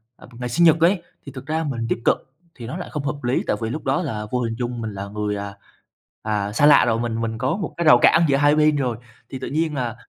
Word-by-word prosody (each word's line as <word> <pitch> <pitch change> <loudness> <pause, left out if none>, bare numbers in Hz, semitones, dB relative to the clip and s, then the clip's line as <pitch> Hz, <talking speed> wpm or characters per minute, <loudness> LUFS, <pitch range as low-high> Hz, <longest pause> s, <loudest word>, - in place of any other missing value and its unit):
ờ, - - -16
ngày 125 0 -4
sinh 170 +8 +3
nhật 160 0 +5
ấy, 175 +2 +3 0.2
thì 140 - -8
thực 130 0 -10
ra 160 +1 -1
mình 120 -6 -3
tiếp - - -1
cận - - +4 0.4
thì 120 -3 -9
nó 165 - -5
lại 180 - -7
không 150 -3 -4
hợp 145 -2 -4
lý. 120 +2 0
Tại - - +1
vì 110 - -2
lúc 150 +6 -5
đó 135 +5 0
là 110 -9 -4
vô 125 - 0
hình 115 -1 -2
chung 120 -1 -4
mình 110 -2 -5
là 100 +1 -6
người, 105 0 -3
à, 100 0 -6 0.7
à, 105 -2 -2
xa 140 +7 +2
lạ 145 -3 +7
rồi, 115 -1 +1
mình 115 -1 -2
mình 115 -1 -3
có 130 +8 -1
một 200 - -5
cái 170 - -1
rào 125 - +8
cản 165 +2 +5
giữa 135 -1 +2
hai 145 +1 +4
bên 155 0 +3
rồi 125 -5 -1 0.3
thì 130 - -7
tự - - -5
nhiên 155 +2 -1
là 120 -3 -3
130 Hz, 285 wpm, -22 LUFS, 115-150 Hz, 0.7 s, rào